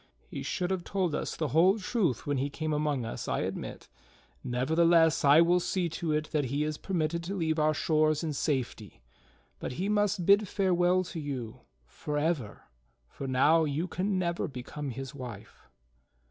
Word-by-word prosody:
He - - -7
should 180 -2 -2
have 185 -2 -1
told 185 -4 -1
us - - -3
the 155 -3 -2
whole 180 - +4
truth 190 - -1
when 145 -1 0
he 135 +2 -1
came 155 +2 -3
among 150 -4 0
us, 115 - -5
I - - 0
admit; - - -5 0.6
nevertheless, 160 +6 +3
I 145 +3 +7
will 175 +1 +4
see 180 0 -1
to 165 0 -3
it 155 0 -1
that 150 -3 +1
he 140 +4 -1
is 155 0 -3
per 190 - -4
mitted 165 +1 0
to 195 +3 -3
leave 160 -3 0
our 155 0 +2
shores 155 0 +2
in 155 -2 -2
safety, 130 - -3 0.6
but - - -4
he 185 +9 -2
must 205 -3 +1
bid 200 +2 +5
farewell 185 -1 +2
to 175 -2 -7
you, 130 -7 -5 0.3
forever, 145 - -3 0.4
for 135 - -7
now 150 +6 +4
you 155 +4 -1
can 190 +3 -1
never 170 -1 -1
become 140 +2 -6
his 135 +3 -6
wife." 125 -7 -10
155 Hz, 175 wpm, -29 LUFS, 140-175 Hz, 0.6 s, I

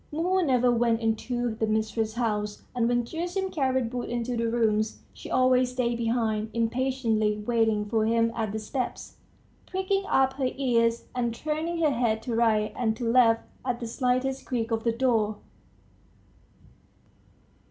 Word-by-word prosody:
Mumu 360 +5 +1
never 250 -4 +3
went 235 -1 +2
into 235 +1 -1
the 220 0 -1
mistress's 220 +1 -1
house; 210 -3 -2
and 240 -2 +1
when 240 -1 +1
Gerasim 355 +6 -3
carried 260 -5 0
wood 245 -1 -3
into 240 +1 -2
the 230 0 0
rooms, 220 -2 0
she - - -10
always 255 0 +3
stayed 240 -2 -1
behind, 225 -2 0
impatiently 230 -3 0
waiting 225 -3 +1
for 220 0 +1
him 230 0 +2
at 220 -2 -2
the 220 - -3
steps, 250 +4 -4 0.5
pricking 380 +1 -1
up 265 0 +3
her 260 -2 +1
ears 235 -3 +1
and 235 -2 -1
turning 310 +5 -2
her 300 - +4
head 230 -3 0
to 240 - -3
right 220 -2 +2
and 225 -3 0
to 235 - -3
left 230 -1 +4 0.2
at 250 -2 -2
the 235 - -4
slightest 255 +3 -1
creak 230 -2 -2
of 225 0 0
the 230 - +3
door 225 -3 +1
235 Hz, 155 wpm, -27 LUFS, 225-255 Hz, 0.5 s, her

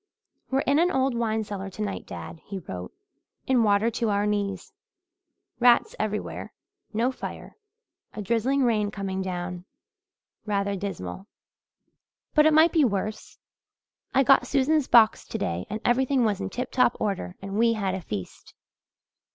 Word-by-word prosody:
"We're 270 +1 +1
in 280 +2 +2
an 350 +2 +4
old 265 -4 +1
wine 220 -2 0
cellar 195 -2 -6
tonight, 200 0 -5
dad," 165 - -8
he 195 - -6
wrote, 90 - -7 0.5
"in 255 -2 +3
water 210 +1 +3
to 230 0 -1
our 205 0 +1
knees. 205 - -2 0.9
Rats 245 - +4
everywhere - - -3 0.4
no 230 +4 +1
fire - - -8 0.6
a 210 - -4
drizzling 235 +6 +1
rain 215 -4 +2
coming 195 -2 -4
down 180 -1 -4 0.8
rather 200 -2 -1
dismal. 190 - -6 1.1
But 300 0 +6
it - - +5
might 320 +2 +6
be 320 -3 +3
worse. 215 -2 -2 0.7
I 270 - +4
got 270 +1 +5
Susan's 285 +1 +2
box 225 -2 +5
today 90 - -3
and 215 - -3
everything 260 +1 +2
was 205 -2 0
in 195 - -3
tip 250 +5 -4
top 250 -2 +3
order 195 -3 -2
and 195 0 -7
we 230 0 +4
had 200 -4 -1
a 190 - -3
feast. 100 - -7
215 Hz, 150 wpm, -26 LUFS, 195-255 Hz, 1.1 s, But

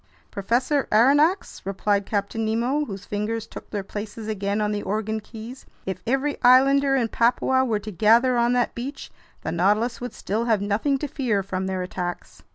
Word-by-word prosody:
"Professor 245 +8 0
Aronnax," 290 - +3
replied 200 +1 0
Captain 205 +2 -2
Nemo, 240 +7 0
whose 195 -4 -8
fingers 215 +2 -3
took - - -11
their 205 -2 -3
places 210 +2 -7
again 200 -1 -1
on 210 0 0
the 205 -1 -2
organ 215 +2 -2
keys, 225 +4 -10 0.2
"if 190 -1 -4
every 270 +4 0
islander 270 +2 +5
in 245 -4 +1
Papua 250 +3 +2
were 230 -5 0
to 210 +1 -7
gather 230 +6 +4
on 240 0 +2
that 245 -1 +1
beach, 260 +5 -6 0.3
the - - -3
Nautilus 210 +8 +1
would 245 - -6
still 220 +4 -2
have 220 -3 +2
nothing 210 +8 0
to 295 - -4
fear 240 -9 -1
from 190 -1 -3
their 185 -1 -2
attacks!" 180 -1 -6
220 Hz, 175 wpm, -24 LUFS, 205-255 Hz, 0.3 s, islander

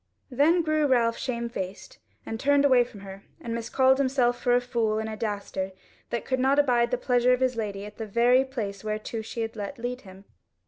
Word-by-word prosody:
Then 320 +7 +3
grew 310 -1 +1
Ralph 235 -3 +2
shamefaced 235 - -5 0.3
and 225 - -5
turned 285 +2 +3
away 255 -3 +5
from 215 -4 -12
her, 195 0 -10 0.2
and 230 - -5
miscalled 260 +3 +2
himself 255 -3 +1
for 245 -1 +3
a - - +5
fool 235 -3 -1
and 220 0 -2
a 220 - -5
dastard 200 -3 -4 0.4
that 235 - -3
could 260 0 -1
not 265 +2 +3
abide 245 -4 +3
the 250 - 0
pleasure 250 0 +2
of 250 - +1
his 255 -1 +1
lady 205 -3 -4
at 210 - -11
the 220 - -5
very 240 +5 +4
place 215 -7 -5
whereto 215 +1 -4
she 225 +1 -6
had 225 0 -4
let 210 +6 -6
lead 245 +2 -4
him. 190 0 -14
235 Hz, 210 wpm, -26 LUFS, 215-260 Hz, 0.4 s, away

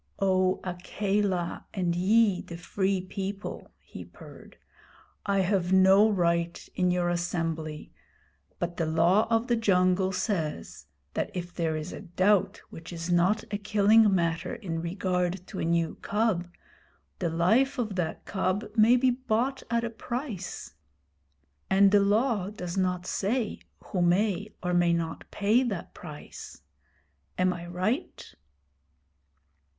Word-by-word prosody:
'O 185 -1 +2
Akela, 190 0 -2
and 175 -3 0
ye 200 +1 +3
the 170 - -9
Free 190 +2 -1
People,' 195 +2 -6
he - - -11
purred, - - -14 0.7
'I 200 -1 +2
have 185 -1 0
no 190 +3 +6
right 170 -3 0
in 180 -1 +1
your 180 -1 +1
assembly; 165 -3 -3 0.7
but 175 0 -4
the 165 - 0
Law 170 +6 +3
of 225 0 +2
the 240 -2 +1
Jungle 185 -3 +2
says 155 - -3 0.3
that - - -1
if 175 -1 -5
there 165 -2 -1
is 155 +3 -5
a - - -7
doubt 190 +1 +1
which 165 +2 -10
is 170 0 -4
not 185 +5 +3
a 205 - -1
killing 210 +1 +4
matter 170 0 -1
in 165 -6 -4
regard 180 +1 -1
to - - -7
a - - -1
new 165 -1 +1
cub, 205 -5 0 0.7
the 175 -4 0
life 220 - +2
of 225 -5 -2
that 175 -3 -3
cub 190 +1 -1
may 225 +2 +6
be 255 0 +3
bought 255 +1 -1
at 235 0 +1
a 235 - -3
price. 230 - -5 1.0
And 195 0 +5
the 205 - +6
Law 205 0 +1
does 180 -4 -6
not 180 -2 0
say 215 +4 -1 0.2
who 185 - -2
may 200 +3 +1
or 180 0 0
may 175 -1 +3
not 165 -1 -3
pay 210 +5 +2
that 215 -9 -4
price. 150 -4 -10 0.7
Am 185 0 +2
I 175 0 -8
right?' 185 +7 -3
185 Hz, 140 wpm, -28 LUFS, 175-210 Hz, 1.0 s, no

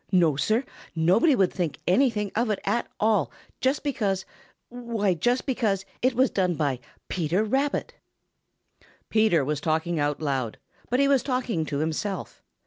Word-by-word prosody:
No, 170 -6 +4
Sir, 215 - +1 0.3
nobody 185 - +4
would 190 -5 +2
think 170 -5 -2
anything 210 -1 +2
of 235 +1 +1
it 210 - +1
at 220 +4 0
all 210 -7 +2 0.3
just 265 +3 +1
because 205 -10 -1 0.4
why 235 -5 -1
just 240 +9 0
because 220 -8 0 0.2
it 255 0 +2
was 260 +2 +3
done 180 -3 +1
by 140 -5 -1 0.3
Peter 175 +3 0
Rabbit." 270 +6 -1 1.2
Peter 215 -10 +3
was 150 0 -2
talking 160 +1 0
out 145 0 0
loud, 135 -7 -2 0.3
but 250 - +1
he 280 - +4
was 275 -2 +4
talking 250 - -1
to 140 - -2
himself. 160 +6 -3
200 Hz, 150 wpm, -26 LUFS, 160-245 Hz, 1.2 s, No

